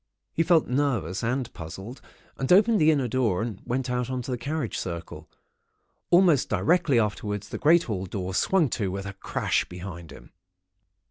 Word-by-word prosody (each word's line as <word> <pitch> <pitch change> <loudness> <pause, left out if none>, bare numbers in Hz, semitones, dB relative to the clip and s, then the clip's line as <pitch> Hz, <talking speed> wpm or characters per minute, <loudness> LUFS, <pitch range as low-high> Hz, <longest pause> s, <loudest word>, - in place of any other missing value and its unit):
"He - - +1
felt 165 -1 +3
nervous 120 - -1
and 125 +1 -2
puzzled, 95 +10 -8 0.3
and 135 - -3
opened 210 +2 +5
the 155 - +5
inner 140 -5 +2
door 110 -5 0
and 110 -4 -6
went 130 +1 -2
out 125 0 -2
on 130 -1 -3
to 130 - -5
the 125 - -1
carriage 140 -2 -3
circle. 85 -2 -6 0.8
Almost 175 -6 +4
directly 165 -6 +2
afterwards, 105 -2 -2
the - - -5
great 165 +3 +5
hall 95 -4 -4
door 95 0 -4
swung 175 - +2
to 105 -5 -2
with 95 +1 -5
a 100 - -6
crash - - -1
behind 90 -2 -9
him. - - -14
120 Hz, 175 wpm, -26 LUFS, 95-145 Hz, 0.8 s, opened